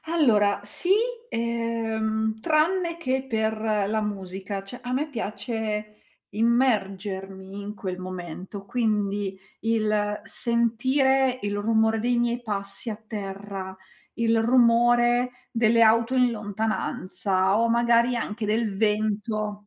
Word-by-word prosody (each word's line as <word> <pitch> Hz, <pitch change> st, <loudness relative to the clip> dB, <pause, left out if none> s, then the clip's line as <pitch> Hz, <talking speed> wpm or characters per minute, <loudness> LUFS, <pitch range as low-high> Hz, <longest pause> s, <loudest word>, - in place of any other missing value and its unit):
Allora, 220 Hz, -12 st, +3 dB
sì, 280 Hz, -, -2 dB, 0.4 s
uhm, 225 Hz, -1 st, -1 dB
tranne 335 Hz, +4 st, +1 dB
che 265 Hz, -5 st, -1 dB
per 220 Hz, -2 st, 0 dB
la 215 Hz, -1 st, 0 dB
musica, 195 Hz, -1 st, -5 dB
cioè 220 Hz, +6 st, -9 dB
a 250 Hz, 0 st, -4 dB
me 285 Hz, +5 st, 0 dB
piace 215 Hz, -3 st, -4 dB, 0.3 s
immergermi 195 Hz, -4 st, -1 dB
in 205 Hz, +1 st, -6 dB
quel 185 Hz, -3 st, -5 dB
momento, 185 Hz, +2 st, -7 dB
quindi 205 Hz, -3 st, -1 dB, 0.2 s
il 215 Hz, -2 st, 0 dB
sentire 255 Hz, +3 st, +2 dB
il 205 Hz, 0 st, -2 dB
rumore 220 Hz, +1 st, +2 dB
dei 240 Hz, +1 st, +1 dB
miei 240 Hz, 0 st, 0 dB
passi 200 Hz, +1 st, -2 dB
a 215 Hz, -, -4 dB
terra, 195 Hz, -2 st, -6 dB, 0.4 s
il 230 Hz, -1 st, +2 dB
rumore 240 Hz, +1 st, +4 dB, 0.2 s
delle 230 Hz, 0 st, +3 dB
auto 230 Hz, +3 st, +4 dB
in 250 Hz, -1 st, +4 dB
lontananza 205 Hz, -2 st, -1 dB
o 230 Hz, 0 st, +2 dB
magari 235 Hz, +1 st, +3 dB
anche 220 Hz, -1 st, -3 dB
del 215 Hz, -1 st, 0 dB
vento. 210 Hz, 0 st, -1 dB
220 Hz, 115 wpm, -25 LUFS, 205-235 Hz, 0.4 s, rumore